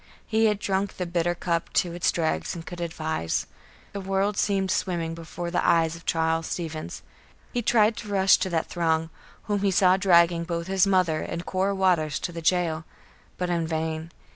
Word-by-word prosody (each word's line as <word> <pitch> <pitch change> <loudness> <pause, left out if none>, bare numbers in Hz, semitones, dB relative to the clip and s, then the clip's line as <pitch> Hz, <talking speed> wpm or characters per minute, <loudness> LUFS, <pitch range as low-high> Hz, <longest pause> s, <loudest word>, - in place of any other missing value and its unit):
He 225 0 +2
had 210 -2 +3
drunk 195 0 -2
the 180 - -2
bitter 175 0 0
cup 170 -1 -2
to 175 -2 +1
its 175 0 +1
dregs 160 0 -1
and 165 -1 -8
could 175 -1 -7
advise. 160 - -2 0.5
The 200 - -4
world 195 +2 0
seemed 195 -2 +1
swimming 170 -3 -1
before 170 +1 -6
the 175 - 0
eyes 165 -1 +3
of 165 - -14
Charles 165 0 +1
Stevens. 160 -3 -5 0.5
He 245 - 0
tried 220 -1 +3
to - - -7
rush 195 -1 +5
to 190 - -2
that 165 -2 0
throng, 160 -2 0 0.3
whom 205 -1 -1
he 200 - +2
saw 185 -1 +4
dragging 170 -3 +4
both 170 0 -3
his 190 +1 +2
mother 180 -5 +2
and 170 +1 -5
Cora 195 +1 0
Waters 175 -6 +2
to - - -3
the 165 -1 -6
jail; 165 -1 +1 0.5
but 180 -1 -2
in 170 -2 0
vain. 160 0 -3
175 Hz, 190 wpm, -26 LUFS, 165-190 Hz, 0.5 s, rush